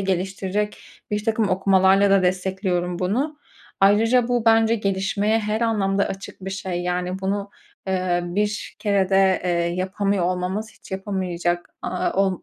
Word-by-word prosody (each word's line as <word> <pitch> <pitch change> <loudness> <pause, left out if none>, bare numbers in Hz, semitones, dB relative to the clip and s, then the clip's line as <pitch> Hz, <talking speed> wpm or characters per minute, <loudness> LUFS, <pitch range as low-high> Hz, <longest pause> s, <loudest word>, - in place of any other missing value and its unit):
geliştirecek 195 +2 -2 0.3
birtakım 215 0 0
okumalarla 190 +1 +4
da 195 -1 +5
destekliyorum 180 -1 -1
bunu. 265 +12 -1 0.4
Ayrıca, 225 +5 +4
bu 245 -2 +1
bence 225 0 +4
gelişmeye 200 +1 0
her 215 0 -2
anlamda 200 -4 +1
açık 195 -1 -8
bir 195 - -4
şey. 185 -2 -3
Yani, 180 +1 -2
bunu, 200 +1 -2 0.4
eee, 185 -2 0
bir 205 +4 -2
kerede, 195 -2 +2
eee, 180 - +1
yapamıyor 185 +3 0
olmamız 185 +4 -2
hiç - - -18
yapamayacak, 180 -3 -2
aaa, 185 - -1
ol 190 -1 0
195 Hz, 130 wpm, -23 LUFS, 185-210 Hz, 0.4 s, da